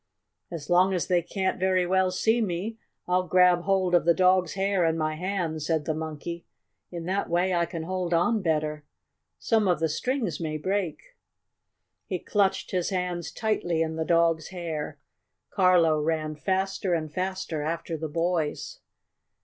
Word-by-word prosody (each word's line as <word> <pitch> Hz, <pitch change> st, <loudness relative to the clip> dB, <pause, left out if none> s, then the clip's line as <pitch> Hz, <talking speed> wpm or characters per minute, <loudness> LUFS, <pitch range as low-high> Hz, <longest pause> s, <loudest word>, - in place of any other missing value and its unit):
"As 160 Hz, -4 st, -7 dB
long 185 Hz, +2 st, +4 dB
as 175 Hz, -, 0 dB
they 180 Hz, -2 st, +2 dB
can't 190 Hz, +2 st, -2 dB
very 185 Hz, -1 st, +2 dB
well 190 Hz, +1 st, +2 dB
see 220 Hz, +6 st, +1 dB
me, 210 Hz, +3 st, -3 dB, 0.3 s
I'll 180 Hz, 0 st, +1 dB
grab 180 Hz, 0 st, +5 dB
hold 190 Hz, -2 st, +1 dB
of 175 Hz, -, +5 dB
the 170 Hz, 0 st, +4 dB
dog's 185 Hz, -2 st, +3 dB
hair 195 Hz, -1 st, +1 dB
in 165 Hz, 0 st, +1 dB
my 155 Hz, -1 st, 0 dB
hands," 165 Hz, -3 st, -3 dB
said 160 Hz, -3 st, 0 dB
the 155 Hz, -, 0 dB
Monkey. 160 Hz, +2 st, -5 dB, 0.5 s
"In 170 Hz, -2 st, -6 dB
that 195 Hz, +3 st, -1 dB
way 180 Hz, +2 st, +1 dB
I 170 Hz, -1 st, +1 dB
can 165 Hz, -1 st, -5 dB
hold 180 Hz, 0 st, -3 dB
on 205 Hz, +7 st, +2 dB
better. 155 Hz, -3 st, -1 dB, 0.5 s
Some 220 Hz, -3 st, +1 dB
of 175 Hz, -4 st, +2 dB
the 160 Hz, -, +2 dB
strings 220 Hz, -, -2 dB
may 155 Hz, -2 st, -3 dB
break." 195 Hz, -, -3 dB, 0.9 s
He 185 Hz, -, -2 dB
clutched 195 Hz, +1 st, 0 dB
his 180 Hz, -2 st, 0 dB
hands 180 Hz, -3 st, -2 dB
tightly 175 Hz, -7 st, 0 dB
in 160 Hz, 0 st, -3 dB
the 160 Hz, -, -1 dB
dog's 165 Hz, -1 st, +2 dB
hair. 170 Hz, -5 st, -5 dB, 0.5 s
Carlo 175 Hz, -5 st, +4 dB
ran 155 Hz, 0 st, -1 dB
faster 190 Hz, +2 st, -1 dB
and 155 Hz, -2 st, -4 dB
faster 185 Hz, -4 st, -3 dB
after 165 Hz, +2 st, -3 dB
the 160 Hz, 0 st, -4 dB
boys. 170 Hz, -, -2 dB
175 Hz, 165 wpm, -27 LUFS, 160-190 Hz, 0.9 s, grab